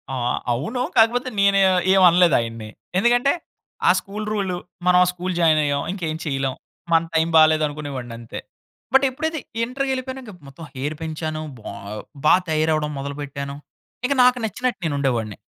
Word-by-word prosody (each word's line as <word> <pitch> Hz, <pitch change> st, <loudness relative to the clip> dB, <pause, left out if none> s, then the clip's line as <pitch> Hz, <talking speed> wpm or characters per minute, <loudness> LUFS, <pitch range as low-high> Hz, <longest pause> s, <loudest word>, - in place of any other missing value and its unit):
ఆహ్, 125 Hz, -1 st, -1 dB, 0.2 s
అవును. 160 Hz, -, -3 dB, 0.2 s
కాకపోతే 240 Hz, +3 st, +4 dB
నేను 200 Hz, 0 st, +4 dB, 0.4 s
ఏమి 190 Hz, -1 st, +5 dB
అనలేదు 175 Hz, -2 st, +4 dB
ఆయన్ని. 115 Hz, -2 st, -5 dB, 0.3 s
ఎందుకంటే 245 Hz, +6 st, +3 dB, 0.6 s
ఆ -, -, +9 dB
స్కూల్ 210 Hz, +2 st, -7 dB
రూల్. 195 Hz, -4 st, -1 dB, 0.3 s
మనం 180 Hz, 0 st, +5 dB
ఆ -, -, +3 dB
స్కూల్ 180 Hz, +1 st, -4 dB
జాయిన్ 160 Hz, -2 st, +4 dB
అయ్యాం 140 Hz, -1 st, 0 dB
ఇంకేం 165 Hz, -5 st, -3 dB
చేయలేం. 135 Hz, -3 st, -1 dB, 0.4 s
మన 165 Hz, -, +6 dB
టైమ్ 160 Hz, +1 st, +2 dB
బాలేదు 155 Hz, 0 st, +5 dB
అనుకునేవాడిని 140 Hz, -5 st, -6 dB
అంతే. 115 Hz, -1 st, -8 dB, 0.5 s
బట్ 270 Hz, -, +6 dB
ఎప్పుడైతే 315 Hz, +4 st, -3 dB, 0.2 s
ఇంటర్‌కి 265 Hz, +3 st, -2 dB
ఎళ్ళిపోయాను 260 Hz, 0 st, -5 dB
ఇంక 220 Hz, -, -10 dB, 0.2 s
మొత్తం 135 Hz, +4 st, -12 dB
హెయిర్ 145 Hz, +4 st, -3 dB
పెంచాను, 155 Hz, -1 st, -4 dB, 0.2 s
బా 105 Hz, -, -8 dB, 0.5 s
బా -, -, +7 dB, 0.2 s
తయారవ్వడం 155 Hz, -1 st, +1 dB
మొదలుపెట్టాను. 140 Hz, 0 st, -5 dB, 0.5 s
ఇంక 270 Hz, -, +2 dB
నాకు 250 Hz, 0 st, +5 dB
నచ్చినట్టు 235 Hz, +1 st, -2 dB
నేను 150 Hz, -3 st, -1 dB
ఉండేవాడిని. 115 Hz, -6 st, -1 dB
160 Hz, 155 wpm, -22 LUFS, 140-215 Hz, 0.6 s, ఆ